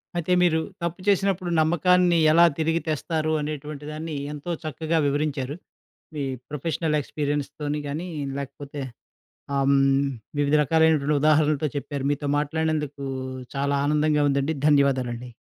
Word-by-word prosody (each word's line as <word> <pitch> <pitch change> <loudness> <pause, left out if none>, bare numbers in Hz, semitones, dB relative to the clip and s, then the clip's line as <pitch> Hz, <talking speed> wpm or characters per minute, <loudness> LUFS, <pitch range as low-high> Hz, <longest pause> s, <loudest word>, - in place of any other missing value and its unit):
అయితే, 175 +1 -2
మీరు 165 -2 +3 0.2
తప్పు 170 +2 -3
చేసినప్పుడు 195 -2 +2
నమ్మకాన్ని 175 +2 +3
ఎలా 170 +2 +7
తిరిగి 165 +1 +1
తెస్తారు. 155 +1 -1
అనేటువంటి 150 0 -5
దాన్నీ 155 0 -5 0.2
ఎంతో 150 +4 -5
చక్కగా 160 +2 -2
వివరించారు. 140 -1 -1 0.6
మీ 145 - -2 0.3
ప్రొఫెషనల్ 150 +1 -1
ఎక్స్‌పీరియన్స్‌తోని 145 +1 -3
గానీ, 155 +6 -4 0.3
లేకపోతే 140 +1 -7 0.7
ఆహ్, 140 0 +2
హ్మ్, 135 0 +3 0.3
వివిధ 145 0 +2
రకాలైనటువంటి 155 -1 +3
ఉదాహరణలతో 155 -1 +3
చెప్పారు. 140 -1 -4
మీతో 145 0 -2
మాట్లాడినందుకూ 150 -2 -2 0.5
చాలా 140 +1 +1
ఆనందంగా 150 0 +2
ఉందండి. 140 +3 0
ధన్యవాదాలండి. 130 -4 +1
150 Hz, 115 wpm, -25 LUFS, 140-160 Hz, 0.7 s, ఎలా